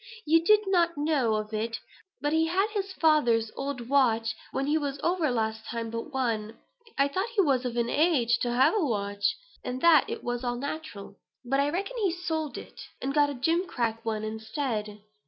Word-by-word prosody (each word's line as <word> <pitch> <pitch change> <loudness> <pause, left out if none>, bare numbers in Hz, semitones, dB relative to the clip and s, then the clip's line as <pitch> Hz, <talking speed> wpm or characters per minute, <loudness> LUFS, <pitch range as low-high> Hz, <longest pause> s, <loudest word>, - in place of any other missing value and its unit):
You 325 +2 +4
did 425 +4 +5
not 345 -4 +2
know 290 -7 +1
of 215 0 -4
it, 225 +1 -2 0.4
but 290 +1 0
he 320 0 +3
had 385 +6 +1
his 400 -2 -3
father's 240 -11 +3
old 275 -4 -4
watch 230 -5 +2 0.2
when 270 - -1
he 295 +2 +1
was 285 -3 -2
over 345 -3 +1
last 220 -2 -1
time 230 -1 -4
but 230 +6 -5
one; 230 -5 -2 0.4
I 275 - +4
thought 380 +10 -2
he 405 - +5
was 265 -5 +1
of 240 -1 -3
an 235 -1 +1
age 275 -5 +2
to 240 - -1
have 255 - +4
a 425 -5 +1
watch, 205 -5 0 0.3
and 250 +1 -4
that 330 -4 +6
it - - -5
was 245 +1 -3
all 245 -1 -1
natural. 280 -8 -6 0.3
But, 270 +3 +1
I 285 +1 +2
reckon 395 +10 -3
he's 360 -5 -1
sold 315 -3 -2
it, - - -10 0.2
and 275 +1 -2
got 295 -1 +4
that 280 -4 -6
gimcrack 275 -9 0
one 220 -1 -2
instead. 220 -1 -4
270 Hz, 195 wpm, -28 LUFS, 230-320 Hz, 0.4 s, that